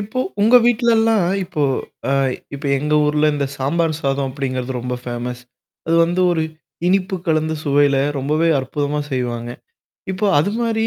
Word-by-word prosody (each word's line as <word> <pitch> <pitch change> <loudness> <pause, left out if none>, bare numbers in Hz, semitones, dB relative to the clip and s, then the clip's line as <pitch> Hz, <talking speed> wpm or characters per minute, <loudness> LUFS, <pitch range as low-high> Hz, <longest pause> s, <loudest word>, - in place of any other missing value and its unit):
இப்போ 220 +6 -3 0.2
உங்க 230 +4 +6
வீட்லல்லாம் 225 -4 +3 0.2
இப்போ 155 -3 -3 0.5
அ - - +2 0.4
இப்ப 140 +2 -9
எங்க 150 +2 0
ஊர்ல 150 +1 +2
இந்த 140 -1 -1
சாம்பார் 160 +5 0
சாதம் 135 0 0
அப்படிங்கிறது 130 -1 -3
ரொம்ப 125 +1 -3
ஃபேமஸ் 125 0 -5 0.5
அது 165 +1 +2
வந்து 175 +2 -1
ஒரு 160 -2 +1 0.4
இனிப்பு 190 +1 +1
கலந்த 160 -1 +1
சுவையில 140 -1 +3 0.2
ரொம்பவே 155 +5 +1
அற்புதமா 145 +2 -2
செய்வாங்க. 120 -2 -2 0.6
இப்போ 200 +3 -1
அது 200 +7 -1
மாரி. 225 -1 0
150 Hz, 145 wpm, -19 LUFS, 135-190 Hz, 0.6 s, உங்க